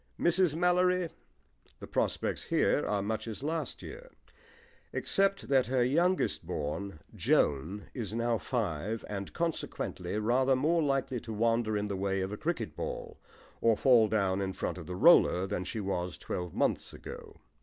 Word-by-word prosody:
MRS. 175 -2 +3
MALLORY 180 0 +2 0.7
The - - -7
prospects - - -1
here - - +2
are 100 -1 0
much 110 +2 -3
as 110 +4 -6
last 160 +1 -3
year, - - -9 0.8
except 195 0 +1
that 135 -2 +3
her 130 -1 +2
youngest 170 +9 +1
born, 75 +3 -4
Joan, 80 +9 +1
is 110 -4 -4
now 115 -1 +1
five, 110 - -2
and 100 -2 -5
consequently 155 - -3
rather 130 +5 +3
more 160 +6 +2
likely 135 -3 0
to 115 - -8
wander 115 0 +1
in 105 - -1
the 100 -1 -3
way 95 0 -1
of 95 +1 -3
a - - -3
cricket 170 +8 -3
ball - - -5 0.4
or 115 -2 +4
fall 120 -4 +5
down 100 -3 +1
in 95 -1 -2
front - - -3
of 85 - -9
the 90 - -4
roller 95 - +6
than 90 -1 -3
she 110 - -4
was 90 -4 -2
twelve 90 -2 -5
months - - 0
ago. - - -10
115 Hz, 160 wpm, -31 LUFS, 100-155 Hz, 0.8 s, roller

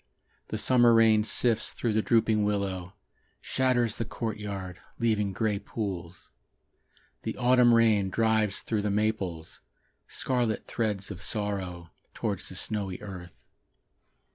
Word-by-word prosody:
The - - -3
summer 120 -2 +5
rain 110 -1 +5
sifts 115 +1 +1
through 115 -3 -2
the 110 - +2
drooping 110 -2 +2
willow, 100 -2 -2 0.4
Shatters 125 -4 +1
the - - -1
courtyard 100 -5 -5 0.2
Leaving 105 -4 +1
grey 105 0 -1
pools. 90 -6 -6 0.9
The - - -4
autumn 125 0 +5
rain 110 -4 +4
drives 110 -1 +1
through 110 -2 -1
the 105 - -1
maples 100 -6 -2 0.5
Scarlet 120 -4 -1
threads 105 -4 -2
of 95 -1 -8
sorrow, 95 -5 -3 0.2
Towards - - -2
the - - -9
snowy 100 -4 -3
earth. 90 -4 -10
105 Hz, 120 wpm, -28 LUFS, 95-115 Hz, 0.9 s, summer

